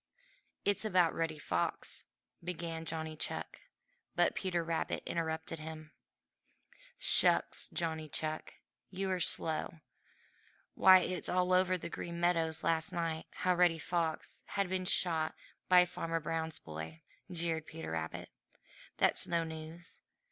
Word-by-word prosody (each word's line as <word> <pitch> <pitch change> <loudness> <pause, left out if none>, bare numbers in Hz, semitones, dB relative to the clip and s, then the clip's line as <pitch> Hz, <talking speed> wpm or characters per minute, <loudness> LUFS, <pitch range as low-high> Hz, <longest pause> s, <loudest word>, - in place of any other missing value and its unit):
"It's 205 +1 +2
about 180 -6 +3
Reddy 160 -2 -1
Fox," 85 -12 -2 0.4
began 165 -2 -4
Johnny 160 -1 -3
Chuck, - - -4 0.5
but - - +4
Peter 175 -3 -1
Rabbit 165 0 -2
interrupted 160 -1 -2
him. 155 0 -8 1.1
"Shucks, - - +4
Johnny 160 -2 -2
Chuck! 155 +1 -3 0.3
You 190 0 -2
are 185 - 0
slow! 160 -1 +2 0.9
Why, 185 -1 +8
it 180 0 -1
was - - -2
all 180 0 +2
over 185 0 +4
Green 170 0 -5
Meadows 165 -2 +1
last 160 -1 +1
night 165 -2 -2
how 185 - +1
Reddy 175 -2 +4
Fox 160 0 -2
had 200 -2 -1
been 185 0 -1
shot 160 -3 +2 0.3
by 180 -1 +8
Farmer 165 -2 -3
Brown's 160 0 -2
boy!" 80 - -8 0.3
jeered 165 -3 -1
Peter 160 - -7
Rabbit. 80 0 -4 0.7
"That's - - +3
no 170 -1 +1
news. 160 +2 -7
165 Hz, 125 wpm, -34 LUFS, 160-180 Hz, 1.1 s, Why